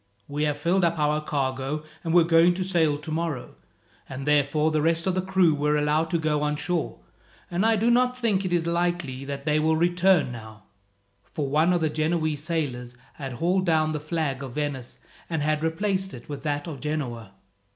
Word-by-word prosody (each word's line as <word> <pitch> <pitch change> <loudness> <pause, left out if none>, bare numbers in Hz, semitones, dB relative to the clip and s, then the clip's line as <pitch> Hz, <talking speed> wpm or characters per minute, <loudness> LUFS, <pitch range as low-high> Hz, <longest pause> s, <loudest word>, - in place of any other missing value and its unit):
"We 145 +1 -1
have 145 -1 -1
filled 175 +5 +1
up 170 -1 +2
our 150 0 +1
cargo, 135 +1 -2 0.2
and 165 - -2
were 175 0 +6
going 165 +1 +4
to 185 - -2
sail 165 -6 +1
tomorrow, 155 -3 -4 0.6
and 135 0 -6
therefore 150 +1 +2
the 155 -1 +1
rest 165 +1 +1
of 190 - +1
the 185 - 0
crew 185 -3 +3
were 150 +1 +1
allowed 150 +2 +1
to 170 - +1
go 155 -2 0
on 150 0 0
shore; 170 +2 -2 0.5
and 175 +3 0
I 225 0 +4
do 225 +3 +2
not 250 +1 +3
think 215 -6 +1
it 185 - -3
is 170 -2 +1
likely 170 -6 -1
that 140 0 -6
they 150 0 +2
will 160 +1 +2
return 175 -3 +3
now," 110 -3 -10 0.6
for 140 +4 -4
one 155 +5 +3
of 175 -2 +1
the 160 - +2
Genoese 155 -1 -1
sailors 135 -7 -3 0.2
had 135 -3 -5
hauled 180 +7 0
down 155 -1 +2
the 150 - -2
flag 150 -3 -2
of 130 -3 -7
Venice, 145 -4 -3 0.3
and 160 -3 -1
had 155 0 0
replaced 190 +2 -1
it 120 - -12
with 145 -2 -6
that 145 -1 -2
of 150 -5 -7
Genoa. 125 -9 -4
155 Hz, 200 wpm, -25 LUFS, 145-175 Hz, 0.6 s, were